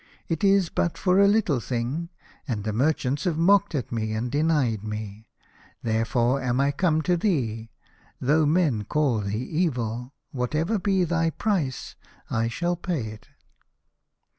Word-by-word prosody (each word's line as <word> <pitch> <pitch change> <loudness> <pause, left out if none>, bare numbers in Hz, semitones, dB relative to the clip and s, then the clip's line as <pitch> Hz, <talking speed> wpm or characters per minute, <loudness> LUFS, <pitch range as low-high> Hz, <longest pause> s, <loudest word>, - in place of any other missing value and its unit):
It 165 +1 -2
is 195 -3 +4
but 170 - -1
for 185 0 +3
a 200 - +6
little 200 - +2
thing, 125 +8 -3 0.4
and 110 -6 -2
the 110 0 -2
merchants 140 - 0
have 170 -4 0
mocked 195 +1 +3
at 130 - -3
me, 110 -2 -2
and 115 +3 -2
denied 145 -8 +1
me. 105 0 -6 0.6
There 115 0 +1
fore 125 +2 +1
am 125 0 0
I 140 +1 +3
come 160 +1 +1
to 180 +1 +2
thee, 120 - -1 0.5
though 150 +4 +3
men 150 -9 +2
call 140 -3 +1
thee 100 +1 -2
evil, 125 -8 -1
and 125 +2 -13 0.3
whatever 155 - 0
be 190 -1 +2
thy 165 -1 +1
price 165 -7 -2 0.4
I 115 +1 +1
shall 175 +9 -1
pay 160 -11 -3
it." 105 0 -12
140 Hz, 160 wpm, -25 LUFS, 115-170 Hz, 0.6 s, a